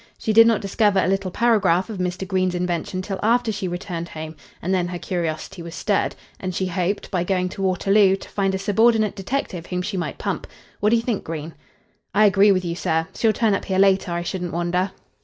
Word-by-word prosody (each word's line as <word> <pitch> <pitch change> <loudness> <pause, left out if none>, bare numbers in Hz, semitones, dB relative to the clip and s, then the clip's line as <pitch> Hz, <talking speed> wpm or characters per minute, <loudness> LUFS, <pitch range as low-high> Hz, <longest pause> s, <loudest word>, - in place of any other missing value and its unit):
She 220 - -1
did 225 +1 +8
not 230 -3 +2
discover 205 0 +2
a - - +2
little 195 0 0
paragraph 195 -4 +2
of 215 -4 -6
Mr. 180 +1 -2
Green's 185 -1 0
invention 180 +1 -2
till 195 0 -4
after 235 +1 +2
she 200 -2 -3
returned 175 -1 -5
home, 160 0 -7 0.2
and 185 +3 -2
then 180 -2 +1
her 175 0 -4
curiosity 170 +1 -4
was 170 +1 -8
stirred, 205 -2 0 0.2
and 185 -2 -4
she 190 - 0
hoped, 185 +2 -2
by 180 -3 0
going 180 0 0
to 195 - -7
Waterloo, 195 +1 +3
to 195 - -11
find 195 -1 0
a - - 0
subordinate 215 +2 +2
detective 195 -4 -3
whom 180 0 -2
she 200 0 -3
might 175 - -3
pump. - - -3 0.3
What 210 - +3
do 230 - +4
you 230 - +1
think, 235 -4 -2
Green?" 160 0 -6 0.6
"I 215 +1 +6
agree 200 0 +5
with 185 -2 +1
you, 170 - -2
sir. 160 0 -1
She'll 225 - +2
turn 220 -1 +1
up 195 - -1
here 190 - -1
later, 195 -1 +3
I 170 0 -2
shouldn't 175 -1 -4
wonder." 175 +3 0
190 Hz, 220 wpm, -22 LUFS, 175-205 Hz, 0.6 s, did